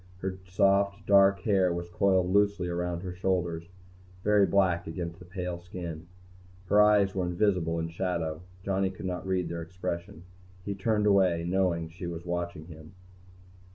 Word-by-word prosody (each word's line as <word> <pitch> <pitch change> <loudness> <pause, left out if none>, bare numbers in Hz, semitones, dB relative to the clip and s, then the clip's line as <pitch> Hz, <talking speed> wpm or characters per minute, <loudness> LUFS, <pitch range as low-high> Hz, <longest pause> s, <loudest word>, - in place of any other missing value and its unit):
Her 95 0 -4
soft, 100 +2 +2
dark 100 -1 +5
hair 95 -3 +2
was 85 0 -3
coiled 95 -1 +2
loosely 100 -3 +2
around 85 0 -2
her 90 -1 -5
shoulders, 85 -2 -1 0.5
very 105 -2 +4
black 90 -4 +2
against 85 +1 -5
the 90 - -12
pale 90 -1 -5
skin. 85 -2 -7 0.6
Her 105 +3 +5
eyes 105 -2 +4
were 95 -2 -1
invisible 90 -2 +1
in 80 0 -2
shadow, 85 -2 -2
and - - -15 0.2
Johnny 95 0 0
could 95 0 -9
not 90 0 -4
read 90 -2 0
their 85 0 -4
expression. 90 +1 -5 0.4
He 100 - -2
turned 105 +2 0
away, 95 -5 +3
knowing 90 -3 +1
she 85 +2 -8
was 85 0 -6
watching 85 -2 -3
him. 80 0 -13
90 Hz, 160 wpm, -29 LUFS, 85-95 Hz, 0.6 s, dark